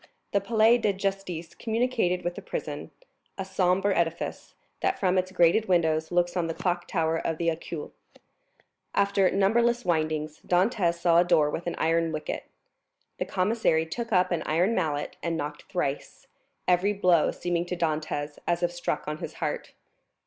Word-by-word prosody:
The 200 Hz, -, +2 dB
Palais 225 Hz, +3 st, +4 dB
de 210 Hz, -3 st, +1 dB
Justice 190 Hz, -4 st, -3 dB
communicated 225 Hz, -6 st, 0 dB
with 175 Hz, -, -1 dB
the -, -, -8 dB
prison,—a 200 Hz, -, -7 dB
sombre 190 Hz, +1 st, +1 dB
edifice, 170 Hz, -1 st, -2 dB, 0.2 s
that 380 Hz, -, 0 dB
from 185 Hz, -2 st, +2 dB
its 185 Hz, 0 st, 0 dB
grated 180 Hz, +4 st, +3 dB
windows 160 Hz, -3 st, +2 dB
looks 175 Hz, 0 st, +1 dB
on 175 Hz, -2 st, 0 dB
the 165 Hz, -, -3 dB
clock 175 Hz, -1 st, -1 dB
tower 165 Hz, 0 st, 0 dB
of 165 Hz, -, -2 dB
the 170 Hz, 0 st, +1 dB
Accoules. 160 Hz, -1 st, -6 dB, 1.0 s
After 200 Hz, -1 st, +3 dB
numberless 235 Hz, +4 st, +2 dB
windings, 155 Hz, -2 st, -1 dB
Dantès 180 Hz, -1 st, +2 dB
saw 170 Hz, 0 st, +4 dB
a -, -, +6 dB
door 160 Hz, -4 st, +3 dB
with 170 Hz, -, -4 dB
an 175 Hz, -, -2 dB
iron 165 Hz, 0 st, +1 dB
wicket. 155 Hz, -1 st, -4 dB, 0.7 s
The -, -, 0 dB
commissary 185 Hz, -5 st, +1 dB
took 230 Hz, +8 st, -5 dB
up 185 Hz, -2 st, +3 dB
an 175 Hz, -, 0 dB
iron 175 Hz, +8 st, +2 dB
mallet 150 Hz, -7 st, -1 dB
and 170 Hz, -1 st, -1 dB
knocked 150 Hz, 0 st, -5 dB
thrice, 145 Hz, -6 st, -3 dB, 0.4 s
every 180 Hz, +3 st, +3 dB
blow 180 Hz, -5 st, +3 dB
seeming 175 Hz, 0 st, -2 dB
to 180 Hz, -, -3 dB
Dantès 155 Hz, -2 st, -2 dB
as 175 Hz, 0 st, +1 dB
if 175 Hz, -, +2 dB
struck 175 Hz, 0 st, -3 dB
on 150 Hz, 0 st, -3 dB
his -, -, -6 dB
heart. -, -, -4 dB
175 Hz, 165 wpm, -27 LUFS, 165-195 Hz, 1.0 s, a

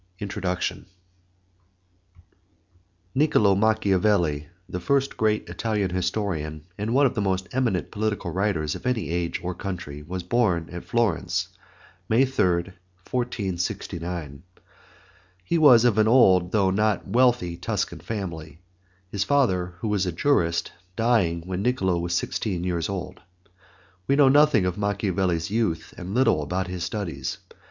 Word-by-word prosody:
INTRODUCTION 95 Hz, -2 st, -3 dB, 2.3 s
Niccolo 130 Hz, -8 st, +4 dB
Machiavelli, 100 Hz, -7 st, +2 dB, 0.2 s
the 90 Hz, -1 st, -4 dB
first 135 Hz, +8 st, 0 dB
great 110 Hz, -1 st, 0 dB
Italian 105 Hz, -5 st, -1 dB
historian, 90 Hz, -5 st, -2 dB
and 105 Hz, +3 st, -3 dB
one 140 Hz, +1 st, +5 dB
of 130 Hz, -, +2 dB
the 110 Hz, -, -1 dB
most 95 Hz, -1 st, -1 dB
eminent 120 Hz, -8 st, -1 dB
political 105 Hz, -4 st, -2 dB
writers 90 Hz, -5 st, 0 dB
of -, -, -6 dB
any 120 Hz, -8 st, -1 dB
age 85 Hz, -1 st, -1 dB
or 90 Hz, +1 st, -2 dB
country, 90 Hz, -6 st, -6 dB
was 90 Hz, +4 st, -5 dB
born 90 Hz, -5 st, +1 dB
at 90 Hz, 0 st, -7 dB
Florence, 115 Hz, -7 st, 0 dB, 0.6 s
May 120 Hz, +5 st, +4 dB
3, 90 Hz, -8 st, 0 dB, 0.4 s
1469. 90 Hz, -, -3 dB, 1.0 s
He 165 Hz, -, 0 dB
was 125 Hz, -6 st, +7 dB
of 110 Hz, -3 st, +3 dB
an 110 Hz, -, +4 dB
old 95 Hz, -7 st, +5 dB
though 100 Hz, -3 st, +2 dB
not 105 Hz, 0 st, 0 dB
wealthy 120 Hz, -5 st, +2 dB
Tuscan 85 Hz, -, -3 dB
family, 85 Hz, -8 st, -6 dB, 0.5 s
his 100 Hz, -1 st, 0 dB
father, 95 Hz, -10 st, +1 dB
who -, -, -2 dB
was 100 Hz, -3 st, 0 dB
a -, -, 0 dB
jurist, 85 Hz, -, +1 dB, 0.2 s
dying 110 Hz, -8 st, +2 dB
when 95 Hz, 0 st, -3 dB
Niccolo 95 Hz, -7 st, +1 dB
was 85 Hz, 0 st, -2 dB
sixteen 90 Hz, -1 st, -2 dB
years 85 Hz, -2 st, -1 dB
old. 95 Hz, -3 st, -5 dB, 0.9 s
We 140 Hz, -, +3 dB
know 140 Hz, -2 st, +6 dB
nothing 145 Hz, -8 st, +5 dB
of 90 Hz, +2 st, -2 dB
Machiavelli's 95 Hz, -4 st, -1 dB
youth 110 Hz, -7 st, -1 dB
and 95 Hz, +4 st, -6 dB
little 130 Hz, -, +3 dB
about 90 Hz, +6 st, -2 dB
his 90 Hz, -2 st, -5 dB
studies. 85 Hz, -11 st, -4 dB
95 Hz, 135 wpm, -25 LUFS, 85-110 Hz, 2.3 s, was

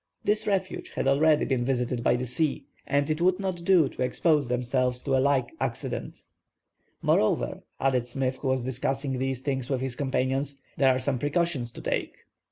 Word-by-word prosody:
This 215 Hz, +1 st, +1 dB
refuge 190 Hz, -2 st, -1 dB
had -, -, -1 dB
already 150 Hz, +2 st, +4 dB
been 130 Hz, -3 st, 0 dB
visited 125 Hz, -1 st, -1 dB
by -, -, +4 dB
the 125 Hz, +1 st, -2 dB
sea, 150 Hz, +5 st, -1 dB, 0.2 s
and 145 Hz, 0 st, +2 dB
it 155 Hz, +1 st, -1 dB
would 180 Hz, +1 st, +3 dB
not 185 Hz, -3 st, -3 dB
do 170 Hz, -5 st, +5 dB
to -, -, -8 dB
expose 145 Hz, +2 st, +2 dB
themselves 125 Hz, +1 st, 0 dB
to 135 Hz, -, 0 dB
a 130 Hz, -, +3 dB
like 135 Hz, -3 st, +2 dB
accident. 125 Hz, -3 st, -4 dB, 0.8 s
"Moreover," 60 Hz, 0 st, +2 dB, 0.2 s
added 130 Hz, -3 st, +1 dB
Smith, 130 Hz, +1 st, -1 dB
who 140 Hz, -, -4 dB
was 130 Hz, -1 st, +1 dB
discussing 130 Hz, +1 st, -2 dB
these 130 Hz, -1 st, -2 dB
things 135 Hz, -3 st, -2 dB
with 130 Hz, -2 st, 0 dB
his 130 Hz, -2 st, -3 dB
companions, 135 Hz, +1 st, -1 dB, 0.2 s
"there 135 Hz, -, +4 dB
are 130 Hz, -, +3 dB
some 130 Hz, 0 st, -1 dB
precautions 145 Hz, -4 st, 0 dB
to -, -, -9 dB
take." -, -, -2 dB
135 Hz, 180 wpm, -27 LUFS, 125-145 Hz, 0.8 s, do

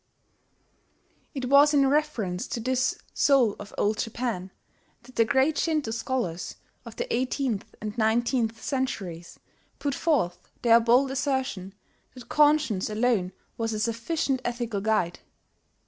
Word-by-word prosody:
It 265 Hz, -2 st, -3 dB
was 285 Hz, +3 st, +6 dB
in 280 Hz, -1 st, +5 dB
reference 265 Hz, -11 st, 0 dB
to -, -, -4 dB
this 255 Hz, +2 st, 0 dB, 0.2 s
"Soul 260 Hz, -7 st, +3 dB
of 205 Hz, -, -9 dB
Old 210 Hz, +1 st, +1 dB
Japan" 225 Hz, -5 st, -3 dB, 0.5 s
that 255 Hz, +1 st, -16 dB
the 230 Hz, -, +5 dB
great 280 Hz, +5 st, +2 dB
Shinto 305 Hz, -8 st, 0 dB
scholars 230 Hz, -8 st, -3 dB, 0.3 s
of 230 Hz, -, -9 dB
the -, -, -2 dB
eighteenth 250 Hz, -3 st, -2 dB
and 210 Hz, 0 st, -5 dB
nineteenth 230 Hz, +1 st, +1 dB
centuries 195 Hz, -, -4 dB, 0.4 s
put 285 Hz, -1 st, -2 dB
forth 260 Hz, -, 0 dB
their 230 Hz, -1 st, +7 dB
bold 245 Hz, +4 st, +3 dB
assertion 260 Hz, -8 st, -2 dB, 0.4 s
that 250 Hz, -, -11 dB
conscience 295 Hz, -10 st, +3 dB
alone 215 Hz, -4 st, +1 dB, 0.3 s
was 225 Hz, -1 st, -1 dB
a 215 Hz, -, -2 dB
sufficient 250 Hz, +5 st, -1 dB
ethical 235 Hz, -4 st, -2 dB
guide. 200 Hz, -5 st, 0 dB
235 Hz, 130 wpm, -26 LUFS, 215-270 Hz, 0.5 s, their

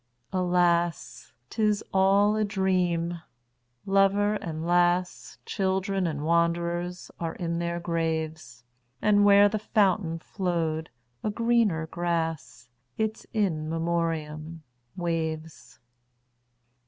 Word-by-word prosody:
Alas! 175 Hz, -2 st, 0 dB, 0.2 s
't 225 Hz, -, -3 dB
is 210 Hz, -1 st, +2 dB
all 195 Hz, +2 st, +4 dB
a 215 Hz, -, +1 dB
dream. 180 Hz, -4 st, 0 dB, 0.6 s
Lover 195 Hz, +1 st, +3 dB
and 165 Hz, -6 st, -4 dB
lass, 175 Hz, +1 st, +1 dB
Children 190 Hz, -1 st, 0 dB
and 150 Hz, -2 st, -3 dB
wanderers, 170 Hz, +2 st, 0 dB
are 165 Hz, -1 st, -3 dB
in 170 Hz, -1 st, -2 dB
their 170 Hz, 0 st, -2 dB
graves; 160 Hz, -6 st, -3 dB, 0.4 s
And 205 Hz, +3 st, +4 dB
where 200 Hz, 0 st, +7 dB
the 210 Hz, +1 st, -2 dB
fountain 195 Hz, -5 st, +1 dB
flow'd 165 Hz, -3 st, -2 dB, 0.3 s
a -, -, 0 dB
greener 225 Hz, -7 st, +1 dB
grass—Its 160 Hz, -, -4 dB
In 165 Hz, -8 st, -1 dB
Memoriam—waves. 160 Hz, -1 st, -4 dB
170 Hz, 90 wpm, -27 LUFS, 160-195 Hz, 0.6 s, where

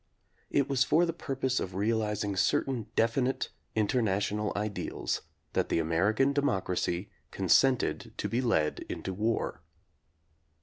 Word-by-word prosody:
It 140 Hz, -1 st, +2 dB
was 135 Hz, -2 st, +3 dB
for 160 Hz, +6 st, +4 dB
the 165 Hz, -, -2 dB
purpose 135 Hz, -5 st, -1 dB
of 90 Hz, -1 st, -4 dB
realizing 105 Hz, -1 st, 0 dB
certain 115 Hz, +4 st, +1 dB
definite 125 Hz, +4 st, +1 dB, 0.3 s
international 105 Hz, -2 st, +1 dB
ideals 105 Hz, 0 st, -2 dB, 0.3 s
that -, -, +1 dB
the -, -, +1 dB
American 100 Hz, -, +2 dB
democracy 95 Hz, -8 st, 0 dB, 0.2 s
consented 135 Hz, -2 st, +2 dB
to -, -, -1 dB
be 120 Hz, +2 st, 0 dB
led 80 Hz, -12 st, +1 dB
into 95 Hz, -, -4 dB
war. 110 Hz, +4 st, -1 dB
110 Hz, 120 wpm, -30 LUFS, 100-130 Hz, 0.3 s, for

